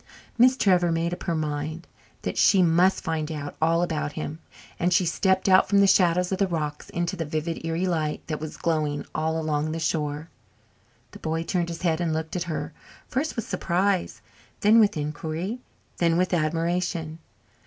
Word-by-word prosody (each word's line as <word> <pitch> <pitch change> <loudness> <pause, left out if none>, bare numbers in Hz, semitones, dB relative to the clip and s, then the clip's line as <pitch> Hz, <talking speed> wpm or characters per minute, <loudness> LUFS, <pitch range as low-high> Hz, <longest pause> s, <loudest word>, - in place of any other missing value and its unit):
Miss 255 +2 +5
Trevor 180 -6 +3
made 165 +1 0
up - - -6
her 170 - 0
mind 155 +2 -3 0.4
that - - -3
she 190 -2 +5
must 175 +3 +3
find 160 -1 -2
out 145 -2 -5
all 165 +2 +3
about 150 -3 -2
him, 155 0 -5 0.4
and 175 +1 +1
she 180 +1 +3
stepped 190 +3 +1
out 190 0 +5
from 200 0 +4
the 200 - +6
shadows 180 -1 +3
of 190 - -1
the 195 - +3
rocks 150 -4 -4
into 175 +2 -2
the 170 - -3
vivid, 155 +2 -3
eerie 165 +2 -1
light 160 -4 -1
that 155 -2 -4
was 155 0 -7
glowing 155 -3 -1
all 160 +1 -1
along 155 -1 -1
the 165 - -3
shore. 150 -1 -2 0.8
The - - -12
boy 160 +1 -2
turned 175 0 -1
his 170 +1 -6
head 165 -1 +1
and 165 -2 0
looked 160 +2 -4
at 175 -1 -1
her, 150 -1 -4 0.3
first 285 +5 -2
with 230 - -4
surprise, 185 +1 0 0.4
then 215 +3 +6
with 210 -6 +3
inquiry, 155 +8 -3 0.4
then 170 -1 +2
with 180 +1 +1
admiration. 165 0 -1
165 Hz, 185 wpm, -25 LUFS, 155-180 Hz, 0.8 s, the